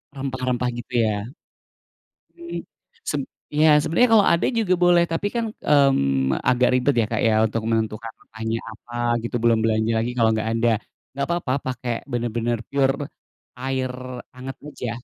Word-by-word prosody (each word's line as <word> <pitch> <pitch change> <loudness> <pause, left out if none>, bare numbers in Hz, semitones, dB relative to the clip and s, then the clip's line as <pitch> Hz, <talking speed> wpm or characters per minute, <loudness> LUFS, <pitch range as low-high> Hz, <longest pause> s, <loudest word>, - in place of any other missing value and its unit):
Rempah-rempah 130 -2 -1
gitu 120 +1 -8
ya? 105 -1 -1 1.1
Mmm, 340 0 -6 0.4
seb 145 - -1 0.3
iya, 150 0 +5
sebenarnya 225 +11 +3
kalau 205 - +6
ada 170 - +2
juga 225 -7 +1
boleh, 175 -1 +5
tapi 185 +5 0
kan, 235 - 0
mmm, 70 - +2
agak 125 0 +3
ribet 125 +2 +2
ya, 115 -2 +3
Kak, 110 - 0
ya, 110 -1 +3
untuk 110 0 -1
menentukan 110 0 -1
makannya 110 +1 -4
apa 120 +2 -13 0.3
gitu, 120 - -3
belum 115 -1 +4
belanja 110 0 +1
lagi, 115 +2 -1
kalau 115 -2 +4
nggak 110 0 -1
ada. 115 +1 +2 0.4
Nggak 140 +1 -2
papa 170 -6 -1 0.2
pake 120 0 -4
bener-bener 120 -2 -1
pure 140 +1 +1 0.5
air 130 0 -2 0.4
hangat 130 +1 -7
aja. 125 -5 -5
125 Hz, 150 wpm, -23 LUFS, 115-145 Hz, 1.1 s, kalau